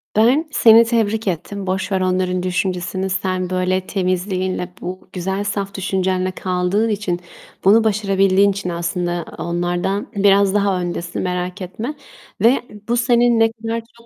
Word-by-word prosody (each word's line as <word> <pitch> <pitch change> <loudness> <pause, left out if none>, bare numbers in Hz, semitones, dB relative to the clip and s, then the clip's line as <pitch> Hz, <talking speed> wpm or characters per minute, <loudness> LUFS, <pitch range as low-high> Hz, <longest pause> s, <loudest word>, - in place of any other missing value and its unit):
Ben 250 +9 +3
seni 230 -4 +7
tebrik 225 -2 0
ettim. 190 +3 -3
Boş 190 +2 -2
ver 190 -1 +1
onların 185 0 0
düşüncesini. 185 +1 -2
Sen, 185 -1 -1
böyle, 185 0 0
temizliğinle, 185 0 -2
bu 185 +1 -7
güzel 190 +2 -2
saf 200 -1 -3
düşüncenle 185 -1 -1
kaldığın 185 +4 0
için, 195 -4 -1 0.4
bunu 215 +4 +6
başarabildiğin 195 -2 +3
için 195 -2 -4
aslında 175 0 -2
onlardan 175 +4 -2
biraz 200 -1 +4
daha 200 -3 +1
öndesin, 175 -1 -4
merak 180 +1 -3
etme 215 +10 -5 0.5
ve 235 +5 +4 0.3
bu 240 +1 +1
senin 240 -1 +3
ne 225 0 +4
kadar 225 0 -4 0.2
çok 235 - -19
190 Hz, 140 wpm, -19 LUFS, 180-210 Hz, 0.5 s, seni